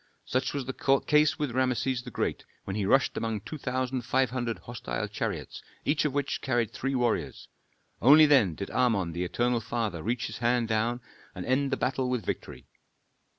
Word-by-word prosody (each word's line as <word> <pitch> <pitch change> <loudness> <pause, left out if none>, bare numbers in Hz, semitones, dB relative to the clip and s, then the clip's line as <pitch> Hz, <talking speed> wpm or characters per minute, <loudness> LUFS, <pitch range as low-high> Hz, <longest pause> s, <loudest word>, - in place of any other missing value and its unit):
Such 130 +2 -1
was 140 -3 -2
the 135 +1 +1
case 150 0 +4
with 145 -4 -2
Rameses 125 0 0
the - - -9
Great - - -2 0.2
when 95 - -4
he 100 -2 -1
rushed 135 +5 +3
among 110 -2 -2
two 155 +9 -7
thousand 130 -1 -2
five 130 +1 +1
hundred 120 -3 -2
hostile 120 0 -5
chariots, - - -4 0.2
each 145 +1 +2
of 150 - +1
which 145 0 -1
carried 120 -5 0
three 135 +1 -2
warriors. 120 -2 -1 0.5
Only 150 +6 +8
then 130 - +4
did 100 - -6
Amon 110 -9 +1
the 85 +2 -3
eternal 120 +6 0
father 110 -6 -2
reach 120 +6 -1
his - - -6
hand 120 0 +2
down 115 +3 0 0.3
and 90 - -5
end 135 +2 +1
the 135 - 0
battle 130 0 0
with 125 -4 -2
victory. - - -5
125 Hz, 185 wpm, -28 LUFS, 115-135 Hz, 0.5 s, Only